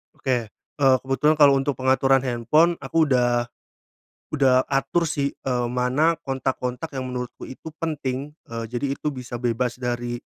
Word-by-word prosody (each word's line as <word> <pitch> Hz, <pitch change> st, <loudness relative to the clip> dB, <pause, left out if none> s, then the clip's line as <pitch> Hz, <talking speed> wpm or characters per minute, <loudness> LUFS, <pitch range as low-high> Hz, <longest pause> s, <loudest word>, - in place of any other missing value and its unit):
Oke, 130 Hz, -2 st, 0 dB, 0.2 s
eee, 135 Hz, -2 st, +1 dB
kebetulan 135 Hz, +3 st, +2 dB
kalau 140 Hz, -2 st, +6 dB
untuk 135 Hz, +1 st, 0 dB
pengaturan 130 Hz, 0 st, +3 dB
handphone 135 Hz, +8 st, +2 dB
aku 160 Hz, -3 st, +1 dB
udah, 120 Hz, -1 st, +2 dB, 0.9 s
udah 130 Hz, -2 st, +3 dB
atur 140 Hz, +5 st, +1 dB
sih, 140 Hz, -2 st, -1 dB
eee, 125 Hz, -2 st, -2 dB
mana 140 Hz, +7 st, +2 dB
kontak-kontak 130 Hz, +2 st, -3 dB
yang 130 Hz, -1 st, -3 dB
menurutku 125 Hz, -1 st, -6 dB
itu 155 Hz, +4 st, -9 dB
penting, 145 Hz, -2 st, -3 dB, 0.2 s
eee, 115 Hz, 0 st, -4 dB
jadi 125 Hz, +4 st, -2 dB
itu -, -, -3 dB
bisa 125 Hz, -3 st, -6 dB
bebas 120 Hz, +1 st, -1 dB
dari 120 Hz, -1 st, -3 dB
130 Hz, 145 wpm, -24 LUFS, 125-145 Hz, 0.9 s, kalau